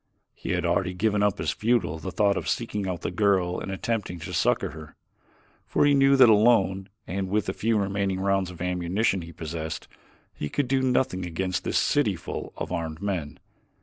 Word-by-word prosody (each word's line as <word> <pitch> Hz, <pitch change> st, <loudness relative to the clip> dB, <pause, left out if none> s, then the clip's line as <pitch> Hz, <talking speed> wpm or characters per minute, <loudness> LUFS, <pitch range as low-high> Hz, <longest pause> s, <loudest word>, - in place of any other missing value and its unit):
He -, -, -4 dB
had 90 Hz, -1 st, -1 dB
already 90 Hz, +1 st, 0 dB
given 105 Hz, +1 st, +1 dB
up 105 Hz, -2 st, +1 dB
as 80 Hz, 0 st, 0 dB
futile 110 Hz, -9 st, 0 dB
the 95 Hz, -, -5 dB
thought 100 Hz, +1 st, +2 dB
of -, -, -3 dB
seeking 105 Hz, -4 st, -2 dB
out 90 Hz, -2 st, -3 dB
the -, -, -3 dB
girl 90 Hz, -2 st, +1 dB
and -, -, -6 dB
attempting 105 Hz, -2 st, -2 dB
to -, -, -6 dB
succor -, -, +1 dB
her, 80 Hz, -1 st, -11 dB, 0.7 s
for -, -, +2 dB
he 145 Hz, -, +5 dB
knew 135 Hz, 0 st, +5 dB
that 130 Hz, -2 st, +8 dB
alone 105 Hz, -3 st, +4 dB, 0.2 s
and 95 Hz, +1 st, -3 dB
with 105 Hz, +1 st, +1 dB
the 95 Hz, -, -2 dB
few 115 Hz, +2 st, +1 dB
remaining 100 Hz, -1 st, -1 dB
rounds 95 Hz, -1 st, +1 dB
of 90 Hz, -1 st, -7 dB
ammunition 90 Hz, +3 st, 0 dB
he 85 Hz, 0 st, -9 dB
possessed, 80 Hz, -1 st, -5 dB, 0.5 s
he 75 Hz, -, -5 dB
could 140 Hz, -, -1 dB
do 135 Hz, +1 st, +2 dB
nothing 125 Hz, -6 st, +1 dB
against 90 Hz, +2 st, -2 dB
this -, -, 0 dB
city -, -, +2 dB
full -, -, -6 dB
of -, -, -5 dB
armed 80 Hz, -1 st, -3 dB
men. 90 Hz, -7 st, -3 dB
95 Hz, 195 wpm, -26 LUFS, 90-105 Hz, 0.7 s, that